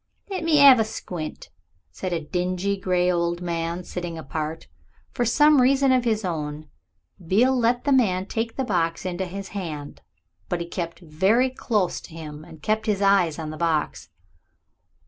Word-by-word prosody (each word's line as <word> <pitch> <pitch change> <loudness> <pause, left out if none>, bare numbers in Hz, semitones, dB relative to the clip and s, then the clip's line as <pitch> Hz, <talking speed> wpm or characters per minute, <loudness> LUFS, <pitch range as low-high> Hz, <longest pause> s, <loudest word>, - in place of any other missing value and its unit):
"Let 375 - -3
me 305 -3 +5
'ave 255 -4 +8
a - - +4
squint," 175 -7 -6 0.4
said 185 - -5
a 170 - 0
dingy 180 +5 -1
gray 180 -2 +1
old 170 0 0
man 170 0 -3
sitting 175 -2 -5
apart. 155 +2 -5 0.4
For 240 - -1
some 295 +4 +5
reason 270 +1 +4
of 255 -1 +2
his 220 -3 0
own 155 -3 -4 0.6
Beale 230 +10 +3
let 245 0 +1
the 285 - 0
old 265 - +6
man 185 -5 0
take 225 +2 -3
the 265 - -1
box 170 -8 -1
into 185 +1 -2
his 195 +2 -7
hand. 155 -7 -6 0.5
But 175 - -1
he 170 - -3
kept 170 0 -5
very 190 +11 +2
close 210 -7 -1
to 165 - -13
him 155 -2 -8
and - - -13
he - - -25
kept 215 +5 -1
his 205 -2 +1
eyes 195 -5 +3
on 155 -2 -5
the 155 - -8
box. 160 -2 -1
180 Hz, 180 wpm, -24 LUFS, 165-225 Hz, 0.6 s, ave